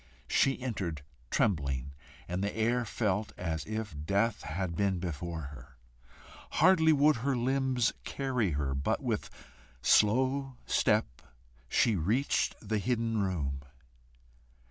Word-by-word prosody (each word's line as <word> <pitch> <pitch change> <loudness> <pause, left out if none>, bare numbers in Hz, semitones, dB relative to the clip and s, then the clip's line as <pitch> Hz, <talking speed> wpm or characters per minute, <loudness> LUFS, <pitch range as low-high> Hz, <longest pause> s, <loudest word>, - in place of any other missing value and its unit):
She 135 -1 +3
entered 95 - -3 0.3
trembling, 70 - 0 0.4
and 90 +2 -2
the 100 +2 -2
air 120 +2 +1
felt 105 -1 -1
as 80 -4 -3
if 110 -4 -4
death 100 +6 +1
had 85 +2 -3
been 100 0 +1
before 85 -1 -4
her. 70 -2 -11 0.8
Hardly 165 -4 +5
would 150 -1 +4
her 130 +2 0
limbs 130 -1 +1
carry 125 - -1
her, 70 -2 -1
but 70 +1 -1
with - - -2 0.5
slow 130 +5 +3
step - - +1 0.5
she 115 - +3
reached 110 - +1
the 110 0 +1
hidden 115 0 0
room. 75 -8 -2
105 Hz, 120 wpm, -31 LUFS, 80-125 Hz, 0.8 s, Hardly